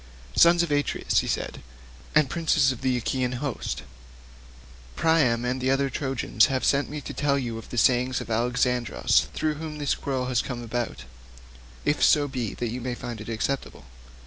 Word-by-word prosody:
"Son 170 +1 +7
of 170 - -3
Atreus," 145 0 +1
he - - -2
said, - - -3 0.5
"and 155 -2 +5
princes 160 -3 +2
of 130 - -7
the 130 -1 +1
Achaean 125 +1 -1
host, 130 0 -4 1.1
Priam 140 -8 +2
and 125 +1 -1
the 130 - +1
other 135 +1 +2
noble 135 -2 -3
Trojans 130 -5 +2
have 130 -1 -1
sent 140 0 +2
me 150 +1 -5
to - - -7
tell 140 -1 +1
you 115 -4 -3
the 120 - -9
saying 125 +1 +4
of - - -7
Alexandrus 120 - +1
through 155 -1 0
whom 155 -1 -5
this 145 -2 0
quarrel 130 -2 -2
has 125 -2 +1
come 120 -2 -5
about, 120 - -3 0.8
if 145 - +1
so 145 -1 +5
be 125 -6 -4
that 120 -2 -3
you 125 +2 -4
may 125 0 -3
find 120 -3 -6
it 110 - -8
acceptable. 115 - -3
130 Hz, 180 wpm, -26 LUFS, 120-140 Hz, 1.1 s, Son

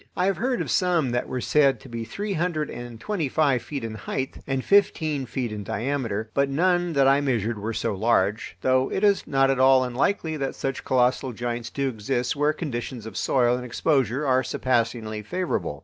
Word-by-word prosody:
I 180 - +2
have 195 0 +1
heard 250 0 0
of - - -3
some 175 -8 +2
that 120 0 -1
were 125 - -3
said 135 -4 +3
to - - -12
be 115 -2 -5
three 200 - -4
hundred 165 -3 -1
and 120 -2 -8
twenty 175 - -2
five 140 -4 +2
feet 140 -4 -6
in 115 -1 -4
height 130 +5 -4
and 135 -1 -2
fifteen 155 -9 +2
feet 120 0 -3
in 105 -1 -5
diameter, 110 -2 -2
but 140 0 +2
none 175 +3 +1
that 140 -2 +4
I 140 +1 +4
measured 115 -5 -1
were 110 +3 -3
so 115 0 -1
large, 105 0 0
though 130 0 +2
it 190 - -2
is 200 -1 +3
not 135 -1 +3
at 135 - -1
all 130 0 +6
unlikely 155 +6 -1
that 135 -2 -3
such 135 -1 -3
colossal 125 0 +1
giants 120 0 -4
do 140 +2 -2
exist 120 +2 -2
where 145 +1 +2
conditions 125 -7 -5
of 110 - -8
soil 125 -2 +2
and 125 - -6
exposure 130 +1 0
are 130 -1 +3
surpassingly 115 -4 -1
favorable. 105 - -3
130 Hz, 200 wpm, -25 LUFS, 115-150 Hz, -, all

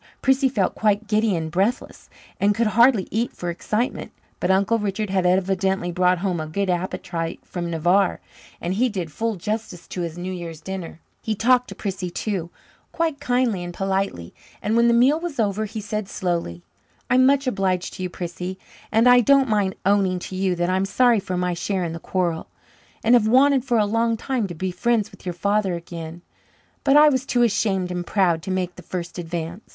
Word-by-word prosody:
Prissy 265 0 +3
felt 205 -7 0
quite 210 0 +1
giddy 215 -2 +2
and 160 -1 -3
breathless, 195 +8 -2 0.3
and 205 +1 +3
could 235 - +1
hardly 230 -1 +4
eat 230 +3 -1
for 175 -1 -4
excitement; 215 +7 -2 0.3
but 180 - -1
Uncle 200 +4 +3
Richard 210 0 -2
had 190 -2 +2
evidently 190 0 +1
brought 180 +1 +2
home 180 -1 -1
a 155 - -4
good 190 +4 -1
appetite 175 -2 -3
from 175 -1 -4
Navarre, 175 +4 +2 0.4
and 175 +2 -2
he 245 +6 +2
did 180 -7 -4
full 225 +7 -2
justice 195 -1 -5
to 180 - -4
his 170 -1 -4
New 180 +1 -4
Year's 170 -3 -7
dinner. 180 -1 -7 0.2
He 220 -2 -2
talked 250 +3 +3
to - - -8
Prissy 190 -3 -4
too, 175 -1 -3 0.4
quite 325 -4 -1
kindly 245 -8 0
and 175 0 -7
politely, 195 - -2 0.3
and 215 - -1
when 235 0 +4
the 235 - +4
meal 265 +6 +4
was 330 -6 -5
over 215 0 0
he 215 +1 -6
said 210 -1 -4
slowly: 170 - -3 0.4
"I'm 255 +1 +4
much 280 0 +3
obliged 190 -6 -1
to 185 - -8
you, 180 - -2
Prissy, 180 +1 -5 0.3
and 225 +3 +4
I 245 0 +8
don't 275 +2 +4
mind 205 -3 +1
owning 195 -2 +3
to 185 - -7
you 185 -1 0
that 175 0 0
I'm 190 +1 +1
sorry 235 +3 +3
for 185 -1 -4
my 180 0 0
share 185 +2 -2
in 165 -1 -3
the 165 - -6
quarrel, 175 -2 -2 0.6
and 230 - +4
have 235 -3 +5
wanted 265 +2 +4
for 245 -3 +2
a 210 - +3
long 230 +2 +1
time 245 -3 -2
to 175 - -7
be 185 +3 -3
friends 220 +3 0
with 195 -2 -13
your 180 - -1
father 200 +1 0
again, 170 0 -8 0.6
but 275 +1 +5
I 300 0 +8
was 260 -3 0
too 245 -2 +1
ashamed 195 -4 +1
and 175 0 -3
proud 175 -4 +1
to 170 - -7
make 185 -1 -2
the - - -9
first 175 0 -6
advance. 170 +3 -5
195 Hz, 200 wpm, -23 LUFS, 180-225 Hz, 0.6 s, I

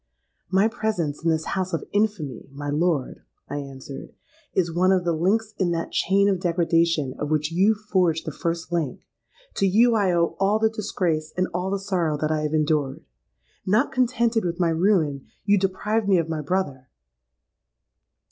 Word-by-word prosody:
'—'My 195 +3 +4
presence 215 -11 -2
in 165 - +2
this 160 -1 0
house 185 -1 -2
of 165 - -2
infamy, 200 - -1
my 145 +1 -5
lord,' 155 -3 0 0.3
I 145 - -4
answered, 135 -1 -8 0.4
'is 175 -3 0
one 185 +2 +3
of 185 -2 +2
the 175 - +1
links 210 +7 0
in 185 -3 +2
that 165 0 -3
chain 200 +2 +2
of 195 -3 +1
degradation 165 -5 +1
of 150 - -2
which 155 0 0
you 195 +6 +3
forged 185 -6 0
the 155 - -3
first 170 +3 -3
link. 165 -6 -2 0.6
To 195 - +3
you 230 +5 +4
I 200 -4 +2
owe 170 -1 +1
all 195 +2 +3
the 220 0 +2
disgrace 175 -8 -2
and 185 0 +1
all 180 +2 -1
the 200 - 0
sorrow 180 -6 -1
that 155 +1 -1
I 155 -1 0
have 150 0 -2
endured. 150 -3 0 0.6
Not 215 +8 +2
contented 235 -3 +1
with 175 0 -3
my 175 -2 +3
ruin, 165 -5 +1 0.2
you 205 -1 +4
deprived 210 +3 0
me 190 - +5
of 165 -2 0
my 160 -1 -3
brother.' 145 -6 -2
175 Hz, 175 wpm, -24 LUFS, 155-200 Hz, 0.6 s, me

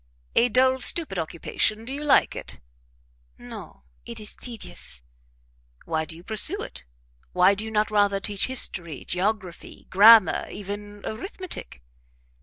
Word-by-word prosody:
"A 245 - +4
dull, 260 +3 +3
stupid 255 - +3
occupation; 175 +7 -2
do 260 - -5
you 290 +2 -5
like 295 - +3
it?" - - -7 0.8
"No 65 - -11 0.2
it 235 -1 -6
is 210 - -6
tedious." 220 - -4 0.8
"Why 160 -1 -1
do 160 - -5
you 170 - -13
pursue 220 - 0
it? - - -6 0.5
Why 185 +2 +5
do 200 +2 -4
you 220 - -5
not 215 0 0
rather 205 -1 +2
teach 200 0 -1
history, 175 - 0
geography, 190 -1 -3
grammar, 210 -1 +7
even 205 +1 -8
arithmetic?" 260 - -7
210 Hz, 135 wpm, -25 LUFS, 185-235 Hz, 0.8 s, grammar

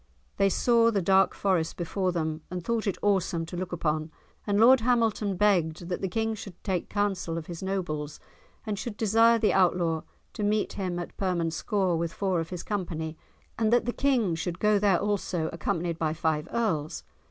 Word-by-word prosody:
They 195 - +4
saw 230 +3 +3
the 210 -3 +1
dark 190 +1 +3
forest 180 -5 0
before 185 +2 -1
them 160 -2 -2
and 180 -1 -5
thought 230 -2 -1
it 195 - 0
awesome 190 -4 +1
to 170 - -8
look 180 0 -4
upon, 155 -2 -1 0.4
and 205 0 +2
Lord 255 +4 +7
Hamilton 225 -5 +1
begged 175 -4 +1
that 180 - -3
the 190 - 0
King 225 +4 -1
should 200 -4 -8
take 185 -4 -2
counsel 195 -5 -1
of 165 - -5
his 170 -1 -7
nobles 165 -6 -3 0.5
and 210 -3 -3
should 210 +1 -5
desire 225 +2 +4
the 220 -2 +2
Outlaw 175 -3 +2 0.3
to 215 - -4
meet 210 +1 +1
him 185 -3 -3
at 175 - -6
Permanscore 180 +1 0
with 170 0 -2
four 190 -3 0
of 165 - -4
his 180 -2 -5
company 165 -6 -3 0.4
and 220 -1 +2
that 240 -1 +3
the 240 - -1
King 250 -10 +1
should 170 +1 -3
go 210 -1 +3
there 195 -3 +3
also 195 -5 -1
accompanied 170 +1 -2
by 155 -1 0
five 155 -2 -1
Earls. 175 -11 -1
185 Hz, 185 wpm, -27 LUFS, 165-210 Hz, 0.5 s, Lord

